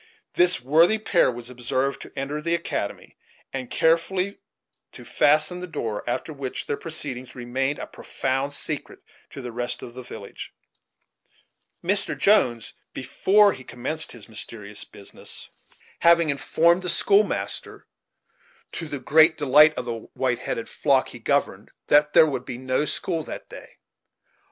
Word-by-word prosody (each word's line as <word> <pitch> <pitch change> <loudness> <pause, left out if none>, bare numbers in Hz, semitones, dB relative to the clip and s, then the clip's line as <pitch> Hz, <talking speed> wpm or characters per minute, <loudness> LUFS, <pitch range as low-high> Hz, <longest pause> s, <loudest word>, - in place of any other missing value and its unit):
This 180 0 +3
worthy 160 - +4
pair 200 -8 +2
was 120 0 -8
observed 130 +2 -2
to - - -10
enter 145 +3 -3
the 170 +2 +1
academy, 165 -11 -4 0.4
and 130 -2 -4
carefully 180 +4 +1 0.5
to - - -11
fasten 155 +4 +2
the 180 - -6
door, 110 -10 -4
after 130 +6 -3
which 135 -3 -5
their - - -1
proceedings 140 -6 -6
remained 130 +3 -2
a - - -5
profound 135 +2 -3
secret 150 0 -5 0.3
to 135 - -9
the 125 - -5
rest 120 +1 -3
of 120 - -9
the 130 - -8
village; 100 -5 -10 1.3
Mr. 195 +3 -1
Jones, 120 - +3 0.2
before 200 - +3
he 130 - -11
commenced 155 +7 -3
this 115 -4 -12
mysterious 105 -1 -8
business, 100 - -11 0.5
having 170 -2 +5
informed 165 +5 +2
the 180 - -2
school 200 +4 +4
master, - - -3 0.9
to 165 - -5
the 145 - -4
great 160 +4 +4
delight 150 +2 +6
of - - -4
the 120 - -2 0.2
white 125 -2 0
headed - - -4
flock - - +1
he - - -9
governed, - - -1 0.2
that 150 0 +4
there - - +8
could 135 -5 -3
be 130 -2 -6
no 130 +3 0
school 165 0 -2
that - - -8
day. - - -12
145 Hz, 150 wpm, -24 LUFS, 125-165 Hz, 1.3 s, there